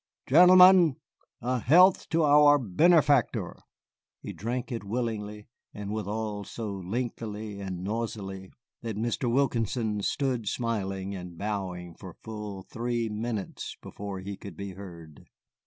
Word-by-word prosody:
"Gentlemen, 180 0 +7 0.5
a 125 +1 -1
health 180 - +5
to 165 0 +2
our 145 0 +6
benefactor." 145 - +2 0.7
They - - -6
drank 120 +5 -4
it 115 -3 -4
willingly, 105 -1 -4 0.3
and 105 -1 -5
withal 105 0 -3
so 110 +1 -6
lengthily 105 +1 -5
and 95 -2 -5
noisily 100 -3 -4 0.3
that 115 -3 -5
Mr. 120 +2 -1
Wilkinson 115 -4 0
stood 125 -1 -1
smiling 100 -4 -2
and 90 -3 -8
bowing 95 -4 -4
for - - -11
full 105 -3 -7
three 120 +1 -3
minutes 110 -1 -5
before 100 -2 -7
he 100 +1 -6
could 100 -5 -10
be 100 -1 -6
heard. 85 -6 -12
110 Hz, 125 wpm, -28 LUFS, 100-125 Hz, 0.7 s, Gentlemen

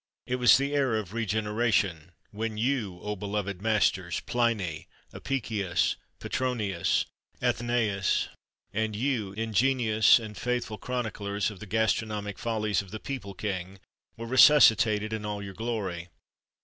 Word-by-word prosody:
It 125 - -1
was 125 -2 +7
the 140 +1 -1
era 135 -6 +2
of 100 -2 -7
regeneration, 105 -6 0 0.2
when 110 +1 -4
you, 110 -6 -1
O, 105 0 -3
beloved 100 -1 -3
masters! 95 -5 +1
Pliny, 110 -10 -1 0.3
Apicius, 100 -10 -1 0.2
Petronius, 110 -9 0 0.3
Athenæus, 115 -5 +1 0.5
and 110 0 -1
you, 110 -5 -1
ingenuous 110 +1 +3
and 110 -3 -7
faithful 120 -2 -2
chroniclers 105 -5 -2
of 100 - -11
the 105 - -9
gastronomic 105 -1 -1
follies 110 -3 0
of 100 - -13
the 110 - -6
people 110 -8 -6
king, 95 -1 -4 0.4
were 115 - -6
resuscitated 115 -5 +6
in 110 -1 -3
all 105 -1 -4
your 100 -1 -7
glory! 95 -6 -4
110 Hz, 125 wpm, -28 LUFS, 100-115 Hz, 0.5 s, was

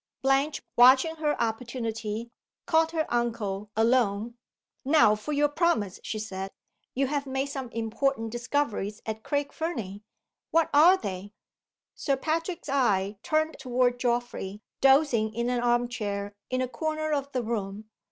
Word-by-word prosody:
Blanche, 270 +2 +2
watching 260 +6 +6
her 300 -1 0
opportunity, 225 -1 -3 0.3
caught 325 -2 +3
her 320 -1 -1
uncle 215 -4 -1
alone. 225 -1 +2 0.5
"Now 285 -6 +5
for 215 +8 -4
your 295 0 +3
promise," 290 - 0
she 220 - -4
said. 195 -3 -5 0.5
"You 275 +2 +2
have 280 0 -2
made 265 +1 -2
some 270 -3 -5
important 230 +1 -1
discoveries 240 -4 -2
at 220 0 -4
Craig 285 -1 -1
Fernie. 220 - -4 0.5
What 330 -1 +2
are 335 +6 +7
they?" 200 - -6 0.6
Sir 275 - 0
Patrick's 330 +4 -2
eye 205 -8 +1
turned 310 +4 0
toward 250 -1 +1
Geoffrey, 240 -5 -2 0.2
dozing 265 -6 +4
in 235 +1 0
an 245 - 0
arm 240 0 +2
chair 205 -4 -4 0.2
in 255 0 0
a - - -1
corner 310 +5 -2
of 280 -1 -2
the 255 -3 -1
room. 210 -2 -4
245 Hz, 140 wpm, -27 LUFS, 220-285 Hz, 0.6 s, are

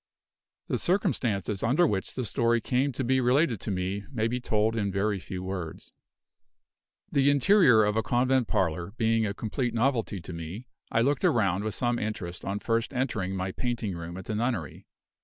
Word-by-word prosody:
The - - -1
circumstances 105 - 0
under 135 +10 +3
which 100 - -1
the 125 - -2
story 115 0 +2
came 130 +5 0
to 130 - -2
be 130 +1 +2
related 125 - +2
to - - -4
me 95 +1 -2
may 115 -4 0
be 125 +2 -2
told 110 -2 +1
in 100 -3 0
very 100 +1 0
few 95 0 -6
words. 95 -4 -6 1.2
The 140 0 +4
interior 145 - +5
of 105 0 +1
a 110 - +2
convent 125 +1 +2
parlor 85 +1 -1
being 115 -1 +2
a 100 - -4
complete 120 +2 -2
novelty 115 -4 0
to 85 +1 -9
me, 85 +8 -7 0.3
I 115 - +3
looked 140 +2 +1
around 100 -4 +2
with 110 0 -2
some 120 -1 0
interest 95 -5 -4
on 100 +1 -2
first 115 +2 -1
entering 110 -7 -1
my 95 0 -2
painting 115 -4 -3
room 85 +1 -7
at 95 - -8
the 110 - -3
nunnery. 110 - -2
110 Hz, 180 wpm, -28 LUFS, 95-125 Hz, 1.2 s, interior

